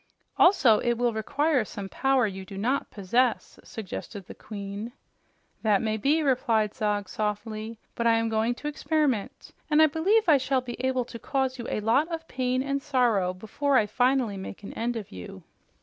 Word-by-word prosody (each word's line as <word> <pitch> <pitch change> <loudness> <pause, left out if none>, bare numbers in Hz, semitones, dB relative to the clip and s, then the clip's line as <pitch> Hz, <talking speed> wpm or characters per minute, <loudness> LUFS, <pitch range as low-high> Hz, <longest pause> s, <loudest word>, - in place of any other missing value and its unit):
"Also, 285 - +5
it 240 - +1
will 240 -1 +1
require 280 +5 +1
some 205 -2 -7
power 270 +3 +2
you 190 -2 -5
do 195 0 -10
not 250 +8 0
possess," 230 +5 0
suggested 205 -1 -7
the - - -10
Queen. 205 +2 -7 0.7
"That 210 -3 +3
may 220 -1 -1
be," 290 +9 +2
replied 230 -6 +1
Zog 210 -4 -1
softly. 215 +2 -4 0.2
"But 235 - 0
I 230 - +5
am 225 0 +1
going 225 +2 0
to 295 - -6
experiment, 295 -7 -1 0.2
and 300 0 +4
I 315 - +8
believe 360 +9 +2
I 305 -3 +7
shall 265 0 +1
be 245 0 -7
able 260 -1 +1
to 230 - -9
cause 265 +1 -1
you 235 - -5
a - - -2
lot 235 +9 +3
of 325 -1 -5
pain 255 0 -1
and 275 0 -1
sorrow 245 -10 +2
before 220 +9 0
I 220 - +4
finally 245 -1 +1
make 190 +1 -8
an - - -8
end 240 +1 -2
of 220 -4 -6
you. 90 -1 -9
235 Hz, 185 wpm, -27 LUFS, 215-270 Hz, 0.7 s, I